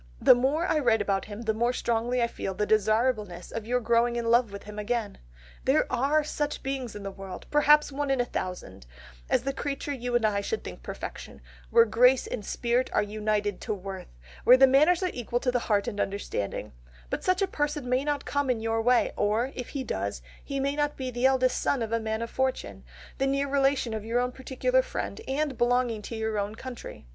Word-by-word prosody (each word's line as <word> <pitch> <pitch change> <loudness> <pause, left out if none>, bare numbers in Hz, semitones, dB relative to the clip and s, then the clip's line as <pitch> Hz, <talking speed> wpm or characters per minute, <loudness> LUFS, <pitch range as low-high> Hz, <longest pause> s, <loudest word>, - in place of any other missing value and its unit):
The - - +8
more 270 +7 +1
I 320 -4 +2
write 235 -5 +3
about 200 -1 0
him 210 +2 -7
the 220 -1 +1
more 235 +3 +1
strongly 240 +1 0
I - - +2
feel 195 -4 -5
the 210 - 0
desirableness 215 -3 +1
of 225 -1 -5
your 250 +1 +1
growing 235 +1 +2
in 230 -1 0
love 235 -2 +4
with 200 0 -8
him 210 0 -8
again.... 220 0 -2 0.5
There - - +3
are 290 +5 +2
such 295 0 -3
beings 265 -4 -3
in 205 - -7
the 195 - -4
world, 195 -1 -9
perhaps 295 0 +5
one 285 +1 -2
in 270 -1 +1
a 245 - +2
thousand, 180 - -6 0.4
as - - +2
the 275 +1 -2
creature 285 +1 -3
you 245 -2 -3
and 240 -2 +3
I 205 -2 +1
should 445 - -3
think - - -8
perfection, - - -7 0.3
where 465 -1 +6
grace 250 - +4
and 215 - -5
spirit 240 +4 0
are - - +3
united 210 -1 -1
to 215 - -2
worth, 190 -1 -7 0.4
where 250 - +8
the 270 - +8
manners 305 +7 +4
are 365 - 0
equal 240 0 -2
to 250 0 0
the 245 - +1
heart 205 -3 0
and 205 -3 -4
understanding, 195 - -3 0.4
but - - -2
such 370 +2 +2
a - - +1
person 295 -5 -2
may 255 +2 +1
not 290 -1 -2
come 285 -1 -1
in 245 -3 +1
your 225 0 0
way, 245 +1 +3
or, 220 +5 +1
if 250 - -6
he 275 -2 -4
does, 100 - -3 0.2
he 275 -1 -3
may 280 +1 0
not 295 0 -1
be 260 -1 -4
the 245 +2 +3
eldest 255 -1 +2
son 265 -5 +1
of 220 - -5
a 230 - +1
man 220 0 -2
of 230 - -6
fortune, 260 0 -2 0.4
the 270 - +2
near 275 +1 0
relation 275 -4 +1
of 215 -1 -4
your 230 +2 0
own 250 0 0
particular 270 - 0
friend 470 - -5
and 275 -1 -1
belonging 240 -2 +2
to 230 - -7
your 220 -1 -1
own 205 +2 -3
country.... 245 - -9
245 Hz, 220 wpm, -27 LUFS, 215-270 Hz, 0.5 s, The